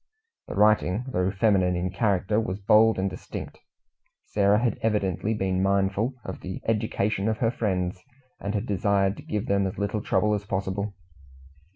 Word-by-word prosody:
The - - -6
writing, 105 +1 +3
though 90 -6 0
feminine 95 -3 +2
in 90 +1 -2
character, 100 0 +1
was 95 -4 -2
bold 105 +2 +4
and 95 +1 0
distinct. 90 -1 -7 0.7
Sarah 100 0 +3
had 120 +1 0
evidently 105 -1 0
been 95 -2 0
mindful 100 +5 +1
of 95 - -6
the 95 0 -6
education 105 -2 0
of 110 - -1
her 115 -1 +1
friends, 95 -5 -2 0.4
and 100 +2 -3
had 105 +2 -1
desired 100 -2 +1
to - - -8
give 105 -1 -3
them 100 -1 +1
as 95 - -6
little 100 +1 -1
trouble 105 0 +1
as 105 -1 -1
possible. 100 +1 -3
100 Hz, 165 wpm, -26 LUFS, 95-105 Hz, 0.7 s, bold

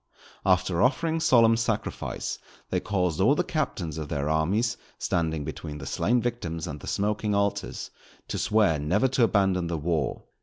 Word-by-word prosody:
After 90 -1 +3
offering 160 +6 +2
solemn 115 -7 +5
sacrifice 115 -2 -2 0.3
they - - +2
caused 90 -3 0
all 130 +9 +5
the 180 - +1
captains 95 - -2
of 75 -2 -5
their 75 +1 -1
armies, 100 +9 +1 0.2
standing 80 -3 -1
between 75 -1 -6
the 70 - -8
slain 120 - +1
victims 90 -10 -3
and 75 -4 -6
the - - -10
smoking 105 +1 0
altars, 100 0 -1 0.4
to - - -3
swear 105 -8 +3
never 90 - +2
to 130 -1 +2
abandon 95 -5 +2
the 85 -1 -2
war. 80 +1 -1
95 Hz, 160 wpm, -27 LUFS, 80-115 Hz, 0.4 s, solemn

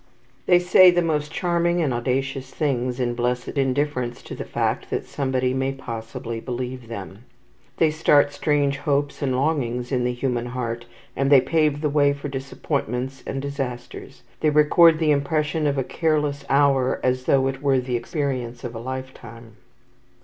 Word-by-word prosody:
They 180 - +6
say 180 +1 +7
the 175 0 +2
most 150 -2 -1
charming 175 0 0
and 150 -6 +1
audacious 130 +2 -2
things, 125 -4 -1
in 120 -1 0
blessed 125 +1 -1
indifference 135 -3 -1
to - - -8
the - - -5
fact - - -2
that - - -2
somebody 130 -2 -1
may 135 +1 -1
possibly 115 -2 -6
believe 125 0 -5
them. 100 -1 -8 0.5
They 160 -2 +3
start 145 -2 +3
strange 145 -2 +1
hopes 145 0 -1
and 130 -3 0
longings 125 -4 -1
in 125 -2 +1
the 125 - +1
human 120 -1 -2
heart, 120 -1 -4 0.3
and 135 +1 0
they 140 - +9
pave 150 +1 +1
the 155 - +1
way 145 -1 +3
for 140 +1 -6
disappointments 135 -1 -3
and 135 0 -3
disasters. 135 -4 -6 0.2
They 155 - +2
record 155 +2 +5
the 155 -1 +2
impression 150 +2 0
of 140 -1 0
a 135 - +1
careless 150 -1 -1
hour 135 -2 +3
as 130 0 0
though 135 -1 +3
it 135 0 -4
were 135 -2 +3
the 125 -1 -3
experience 125 -2 -3
of 120 -2 -5
a 115 - -6
lifetime. 120 -3 -8
135 Hz, 165 wpm, -23 LUFS, 125-145 Hz, 0.5 s, they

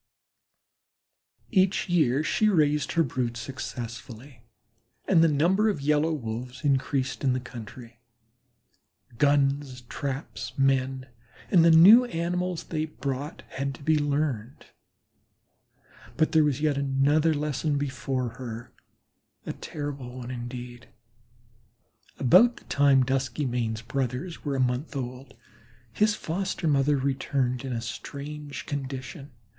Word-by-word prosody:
Each 190 -3 +2
year 155 -6 +2
she 215 +6 +2
raised 150 -6 +2
her 165 - +3
brood 120 -3 -2
successfully 120 0 -7 0.7
and 165 -4 +5
the - - +6
number 175 +9 +3
of 200 - -1
Yellow 150 +3 +2
Wolves 125 -2 -5
increased 135 -1 0
in 130 -2 +3
the 130 - -1
country. 120 -1 -10 1.2
Guns, 140 -2 +2
traps, 120 -2 -5
men 135 -1 +1 0.5
and 175 -4 +6
the 170 - +6
new 195 +10 +8
animals 180 -3 -2
they 155 -1 -2
brought 145 -1 -5
had 140 0 -5
been 150 -2 +2
learned, 140 -5 -2 1.5
but 160 - +2
there 160 -1 +5
was 145 -1 0
yet 150 -2 +1
another 140 +4 +2
lesson 150 0 -1
before 130 -2 -2
her 120 -1 -7 0.7
a - - -4
terrible 140 -4 -6
one 125 0 -6
indeed. 120 0 -7 1.3
About 235 - +5
the - - -14
time 140 -2 +4
Duskymane's 125 -4 -1
brothers 130 +7 -3
were 145 -2 -2
a - - -1
month 130 +4 -1
old 130 0 -6 0.6
his 210 - +2
foster 185 0 -3
mother 145 0 +3
returned 135 -1 -1
in 135 - -4
a 115 -2 -2
strange 145 +5 -7
condition. 135 +1 -6
140 Hz, 120 wpm, -27 LUFS, 125-155 Hz, 1.5 s, new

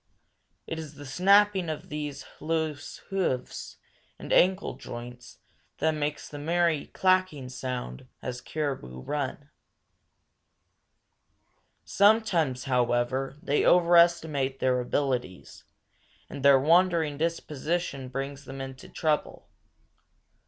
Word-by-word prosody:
It 165 - -5
is 155 -2 -8
the 145 +1 -10
snapping 190 +4 +4
of 155 - -5
these 150 -2 -5
loose 160 -1 -2
hoofs 180 -10 -2 0.4
and - - -4
ankle 185 +2 +3
joints 125 -1 -9 0.4
that 160 +2 +2
makes 150 -1 -3
the 145 - -8
merry 165 0 +1
clacking 185 -8 +1
sound 125 - -5
as 125 -1 -5
caribou 135 - -4
run. 145 - -4 2.3
Sometimes, 195 - +3
however, 125 +1 0
they 145 - +1
overestimate 170 -6 +4
their 125 -1 +2
abilities, 125 - -3 0.7
and 140 - -6
their 140 -1 +7
wandering 165 -1 +3
disposition 155 -3 -2
brings 135 +2 -5
them 135 +1 -8
into 135 -1 -8
trouble. 155 -2 -2
145 Hz, 100 wpm, -27 LUFS, 130-170 Hz, 2.3 s, their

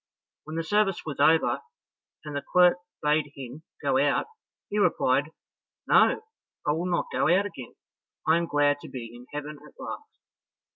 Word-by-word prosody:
When 155 +1 -7
the 165 - -1
service 205 +1 +1
was 150 -4 -5
over, 160 +3 +4 0.6
and 150 -1 -6
the 140 - -1
clerk 180 +2 +4 0.3
bade 150 -1 +2
him 135 +2 -8 0.2
go - - +2
out, - - +2 0.4
he 210 - -1
replied, 140 -7 +2 0.6
"No, - - +4 0.4
I - - +3
will 165 +4 -1
not 175 -1 0
go 140 - +2
out 190 +4 +4
again, 150 -11 -8 0.5
I 160 +1 +5
am 170 0 -1
glad 145 -1 +2
to - - -10
be 115 -3 -7
in 125 +1 -13
heaven 150 0 -6
at - - -17
last." 440 0 -8
150 Hz, 165 wpm, -27 LUFS, 145-175 Hz, 0.6 s, I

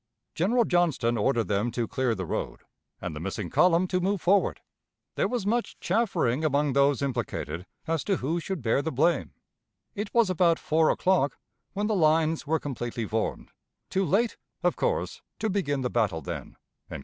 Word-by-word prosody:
General 230 +8 +2
Johnston 160 - +2
ordered 115 -1 +1
them 105 +5 0
to 120 -1 -2
clear 130 -3 0
the 95 -2 -4
road, - - -4 0.4
and - - -5
the - - -5
missing 95 0 -4
column 180 0 +4
to 185 - +1
move 195 +2 0
forward. 195 +4 +2 0.5
There - - +1
was 245 -5 -2
much 235 +3 -1
chaffering 175 - +1
among 145 -2 +2
those 140 0 +3
implicated 115 - -3 0.2
as 165 -2 -1
to 200 - +2
who 165 +3 -1
should 170 -4 -4
bear 115 +4 +2
the 160 - -3
blame.... 160 +6 +1 0.6
It 205 -1 -4
was 230 -5 +3
about 170 -2 +3
four 160 0 +2
o'clock 180 -7 +2 0.4
when 205 +1 -1
the 215 - +1
lines 160 -2 +2
were 160 +1 +2
completely 120 -5 -4
formed 110 +1 -3 0.4
too 195 - +1
late, 205 +7 +1 0.3
of - - +2
course, - - -1 0.2
to 220 - -1
begin 145 -9 0
the 125 - -1
battle 105 -9 +1
then." - - -6
155 Hz, 175 wpm, -27 LUFS, 120-185 Hz, 0.6 s, column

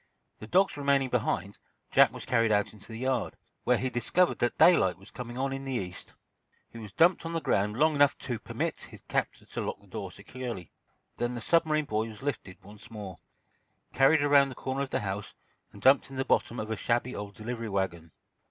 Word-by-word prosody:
The 110 - -9
dogs 190 - +3
remaining 140 -2 +2
behind, 100 -5 -1 0.3
Jack - - +6
was - - -8
carried 115 -2 +2
out 105 0 +1
into 105 - -13
the 110 - -8
yard, 130 -1 -1 0.3
where 125 - +4
he 130 - -1
discovered 170 +10 +1
that 120 - 0
daylight 95 - +5
was 95 +3 -15
coming 120 -1 -7
on 135 +1 -1
in 135 0 -5
the 135 -1 -4
East. 90 -6 -6 0.6
He 115 - -9
was 105 -3 -9
dumped 170 - +4
on 165 0 -4
the 165 - 0
ground 105 -6 0
long 155 +3 +4
enough 145 -1 +4
to 120 -4 -4
permit - - -3
his - - -11
captor - - -2
to - - -5
lock - - -4
the - - -22
door - - -6
securely. 120 -9 -7 0.5
Then 120 +1 -1
the - - -4
submarine 155 +2 +2
boy 110 -2 -1
was 110 +2 -11
lifted 100 -10 -5
once 105 +3 -14
more, 105 -5 -8 0.7
carried 145 +3 +5
around 140 -1 +5
the 130 - -8
corner 130 +2 -3
of 140 - -2
the 130 - -1
house 100 0 -5 0.4
and - - -14
dumped 135 +1 +5
in 135 - -9
the 135 0 -1
bottom 120 - +1
of 110 +1 -4
a - - 0
shabby 120 +3 -1
old 100 -1 -6
delivery 115 0 -5
wagon. 85 -5 -2
120 Hz, 210 wpm, -29 LUFS, 105-135 Hz, 0.7 s, Jack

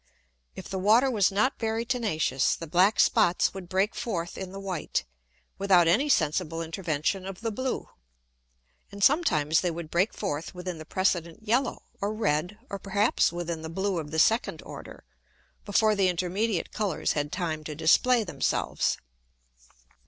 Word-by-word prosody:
If - - -8
the 190 - -4
Water 225 +7 +4
was 205 -5 +3
not 235 +8 +1
very 225 0 -1
tenacious, 210 - 0
the 165 - -7
black 185 +7 +3
Spots 195 -6 +3
would 190 -3 -8
break 195 +3 +1
forth 175 -7 -4
in 190 -1 -6
the 195 - -7
white, 185 - -3 0.5
without 185 -4 +4
any 240 - +3
sensible 165 - +1
intervention 165 +2 -2
of 195 +1 -8
the 225 -1 -2
blue. 255 +4 -3 1.0
And 200 0 -5
sometimes 165 - +3
they 180 - 0
would 165 -1 -6
break 185 +5 +2
forth 170 -3 -4
within 180 -2 -5
the 155 - -9
precedent 175 +2 -1
yellow, 245 +4 0 0.2
or 205 +2 -1
red, 180 -1 -1
or 200 - -6
perhaps 200 +3 +2
within 170 -2 -4
the 160 - -6
blue 190 +1 -1
of 150 -2 -6
the 160 - -4
second 225 +8 +2
order, - - -10 0.6
before 215 +1 +3
the 195 -2 +3
intermediate 180 +2 -1
Colours 205 -6 -1
had 145 0 -2
time 160 -4 -3
to 150 - -5
display 225 - +4
themselves. 180 - -1
190 Hz, 160 wpm, -27 LUFS, 165-215 Hz, 1.0 s, Water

